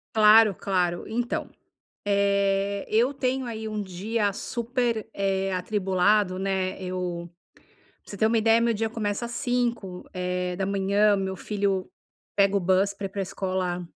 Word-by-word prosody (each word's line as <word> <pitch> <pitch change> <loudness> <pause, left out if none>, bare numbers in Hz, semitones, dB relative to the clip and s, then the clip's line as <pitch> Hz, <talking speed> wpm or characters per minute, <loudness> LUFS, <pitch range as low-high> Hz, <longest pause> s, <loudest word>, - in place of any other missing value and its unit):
Claro, 215 -2 +7
claro. 180 -3 0
Então, 240 +2 -2 0.6
eh, 200 0 +1
eu 235 +5 +2
tenho 265 -1 -1
aí 220 -2 -5
um 215 -1 -3
dia 200 +3 -1
super, 235 +1 -2
eh, 195 -1 0
atribulado, 190 0 +1
né. 190 -1 -1
Eu 180 -2 -4 0.7
pra - - -12
você - - -6
ter 215 +2 +3
uma 230 +1 +2
ideia, 225 +1 +4
meu 235 - +2
dia 225 0 -1
começa 220 0 -2
às 235 - -6
cinco, 235 -7 -2
eh, 180 -1 -2
da 190 +1 -2
manhã, 200 +1 +3
meu 190 -1 -2
filho 195 -1 -1 0.5
pega 200 0 +4
o - - +3
bus 190 +2 +2
pra 200 0 -5
ir - - -16
para 200 +1 -6
a - - 0
escola 185 -2 -2
200 Hz, 160 wpm, -26 LUFS, 190-220 Hz, 0.7 s, Claro